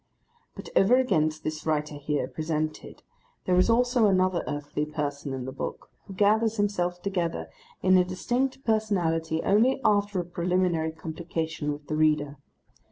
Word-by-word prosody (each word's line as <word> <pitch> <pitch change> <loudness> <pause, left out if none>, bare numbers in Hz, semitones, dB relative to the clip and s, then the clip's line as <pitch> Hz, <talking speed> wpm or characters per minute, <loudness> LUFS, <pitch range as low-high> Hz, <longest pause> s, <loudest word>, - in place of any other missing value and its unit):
But - - -9
over 205 +6 +5
against 155 -12 +1
this 155 0 -4
writer 150 -1 -1
here 145 -2 -2
presented, 155 +1 -4 0.4
there 180 - +2
is 185 +5 +4
also 245 -1 +3
another 185 -2 +2
earthly 145 0 -3
person 145 -2 -4
in 130 -1 -4
the 130 - -5
book, - - -6 0.2
who 195 - -9
gathers 220 +3 +3
himself 180 -4 -1
together 175 -4 -2 0.3
into 185 -1 +6
a - - +2
distinct 245 +9 -2
personality 170 -8 0
only 230 +7 +3
after 205 -2 +2
a 175 - -2
preliminary 175 -2 0
complication 160 -2 -4
with 145 0 -7
the 155 - -3
reader. 150 -2 +1
175 Hz, 150 wpm, -27 LUFS, 155-205 Hz, 0.4 s, into